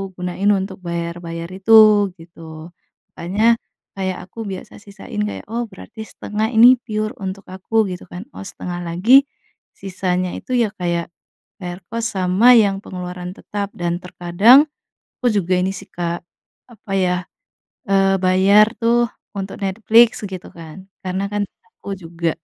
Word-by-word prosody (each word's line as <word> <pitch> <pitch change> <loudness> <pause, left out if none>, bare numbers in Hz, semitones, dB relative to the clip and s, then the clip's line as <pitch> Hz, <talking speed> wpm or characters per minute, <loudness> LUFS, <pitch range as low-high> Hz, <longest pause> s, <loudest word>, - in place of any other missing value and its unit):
gunain 180 +3 -1
untuk 190 -1 -1
bayar-bayar 170 0 -4
itu 195 +4 +1 0.5
gitu, 165 -1 -11 0.5
makanya 210 +7 +2 0.4
kayak 190 -1 -2
aku 210 - -13
biasa 190 - -8
sisain 210 +2 -7
kayak, 210 - -6
"Oh 230 +3 -2
berarti 220 +4 -10
setengah 215 0 -3
ini 240 +2 +8
pure 215 -1 -3
untuk 190 +1 -6
aku," 200 +4 0
gitu 180 - -7
kan, 180 +2 -7
oh - - -7
setengah 180 -2 -6
lagi, 195 +11 +5 0.6
sisanya 185 -1 -2
itu - - -9
ya - - +1
kayak, 170 -1 -1 0.5
bayar 175 0 -6
kos 230 0 -3
sama 190 +6 +4
yang 200 -2 +1
pengeluaran 180 -1 -6
tetap 205 -1 -5
dan 175 0 -2
terkadang, 195 - +5 0.5
aku 250 - +2
juga 185 -1 0
ini 185 - 0
sih - - -9
Kak, 170 0 -4 0.5
apa 215 -2 -13
ya, 180 -1 +2 0.7
eee, 195 0 +3
bayar 190 +3 +5
tuh 235 0 +2 0.3
untuk 195 0 -5
Netflix 225 +4 +4
gitu 185 -2 -8
kan 165 +2 -11 0.2
karena 185 +1 -2
kan 205 0 0 0.4
aku 200 -1 -6
juga, 170 -2 -3
190 Hz, 140 wpm, -20 LUFS, 180-210 Hz, 0.7 s, ini